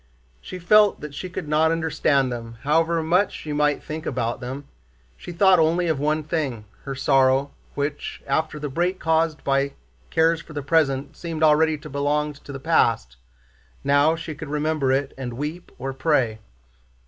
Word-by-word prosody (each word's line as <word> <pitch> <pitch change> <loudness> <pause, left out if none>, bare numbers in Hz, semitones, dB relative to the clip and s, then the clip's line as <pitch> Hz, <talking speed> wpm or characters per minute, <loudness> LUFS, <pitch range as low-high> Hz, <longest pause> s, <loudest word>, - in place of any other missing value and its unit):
She 185 - -8
felt 205 +3 +4
that 150 -1 -7
she 185 +6 -6
could 175 - -6
not 155 +2 +3
understand 150 -5 +1
them 115 -1 -6
however 165 +3 +2
much 180 +5 +2
she 150 - -6
might 145 0 +1
think 155 +1 -6
about 120 -2 -2
them. 135 +3 -6 0.5
She 120 - -9
thought 185 +1 +5
only 165 +2 +2
of 160 -4 0
one 155 +2 0
thing, 145 -9 -3 0.2
her 135 -1 -4
sorrow, 135 0 +3 0.2
which, 145 0 -4
after 155 -1 -1
the 150 0 -4
break 175 +7 -1
caused 160 -1 +1
by 135 0 +1 0.4
cares 160 0 +2
for 155 - -13
the 145 -2 -4
present, 140 -2 +1
seemed 165 -2 -4
already 155 0 +4
to 145 - -11
belong 145 +2 -1
to 145 0 -12
the 135 - -6
past. 115 - +1 0.7
Now 145 +3 +3
she 160 -1 -6
could 155 0 -8
remember 150 -2 0
it 135 +1 0
and 125 -2 -4
weep 150 +6 -5
or 135 +1 -4
pray. 130 -6 +1
150 Hz, 170 wpm, -23 LUFS, 135-160 Hz, 0.7 s, thought